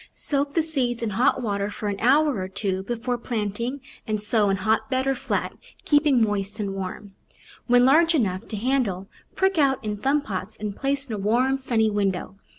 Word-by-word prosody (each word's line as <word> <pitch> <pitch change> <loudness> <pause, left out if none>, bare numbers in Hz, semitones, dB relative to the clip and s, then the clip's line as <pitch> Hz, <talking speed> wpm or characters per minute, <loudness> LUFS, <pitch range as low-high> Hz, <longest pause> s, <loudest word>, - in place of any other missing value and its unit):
Soak 280 0 -1
the 330 - +3
seeds 250 -7 -1
in 220 - -1
hot 245 +6 +2
water 200 -2 -1
for 210 0 -5
an 200 -1 -2
hour 280 0 +3
or 185 - -3
two 190 0 -2
before 240 +4 -3
planting 235 +4 -3 0.3
and 215 -1 -1
sow 210 0 +3
in 195 - +1
hotbed 225 +6 0
or 270 - +2
flat, 255 - -2 0.3
keeping 290 -5 +4
moist 205 0 -2
and 200 -2 -2
warm. 195 +1 -6 0.5
When 245 0 +5
large 325 +5 +5
enough 190 -9 -1
to 215 - -5
handle, 215 -5 -1 0.3
prick 380 -2 +1
out 270 -2 +3
in 210 -1 -2
thumb 275 +7 +1
pots 195 0 -5
and 210 -2 -5
place 275 0 -1
in 230 - -5
a - - -5
warm, 250 +7 +1
sunny 225 -4 +1
window. 195 -2 -2
225 Hz, 190 wpm, -24 LUFS, 205-270 Hz, 0.5 s, When